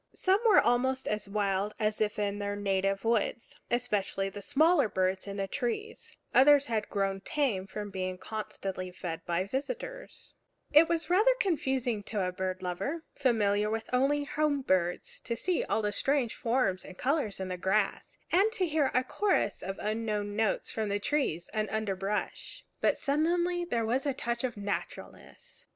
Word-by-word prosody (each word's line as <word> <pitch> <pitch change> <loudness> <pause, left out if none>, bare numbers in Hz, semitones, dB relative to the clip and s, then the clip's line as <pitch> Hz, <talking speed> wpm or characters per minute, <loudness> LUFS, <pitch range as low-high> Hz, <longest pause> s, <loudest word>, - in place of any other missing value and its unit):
Some 380 +1 +3
were 425 - +7
almost 260 +2 +2
as 210 -1 -2
wild 200 0 0
as 215 -1 0
if 210 -1 0
in 205 -1 -1
their 205 0 -2
native 195 0 0
woods, 230 0 0
especially 210 -5 0
the 205 +1 -8
smaller 290 - +3
birds 190 +1 0
in 200 0 -5
the 195 0 -1
trees; 280 - -4 0.2
others 285 +1 +7
had 220 -5 -2
grown 195 -1 -1
tame 210 -6 -1
from 205 0 -6
being 185 -1 -3
constantly 195 -3 -5
fed 175 -2 -6
by 175 +1 +1
visitors. - - -5 0.4
It 315 +3 +7
was 335 0 -1
rather 435 +7 +5
confusing 265 - 0
to 210 -4 -1
a 180 - -1
bird 185 0 -3
lover, 275 - -3
familiar 210 -5 +2 0.2
only 275 +3 +3
with 285 - -7
home 300 -2 +1
birds, 180 -6 0
to 235 - -3
see 360 +9 0
all 220 - 0
the 210 - +1
strange 270 +2 +1
forms 230 -6 0
and 185 - -11
colors 270 -7 0
in 190 -1 -4
the 185 - -2
grass, 195 +2 0
and 390 +6 +4
to 375 - +1
hear 305 -4 +2
a 255 - +4
chorus 315 - 0
of 195 +1 -4
unknown 210 -1 -2
notes 220 -1 0
from 205 -2 -1
trees 200 - 0
and 215 -1 -1
underbrush. 205 -1 -3
But - - +2
suddenly 345 +4 +1
there 235 -9 -1
was 255 +6 0
a 275 - 0
touch 235 -1 -2
of 245 -4 -2
naturalness. 200 0 -6
220 Hz, 170 wpm, -30 LUFS, 195-285 Hz, 0.4 s, were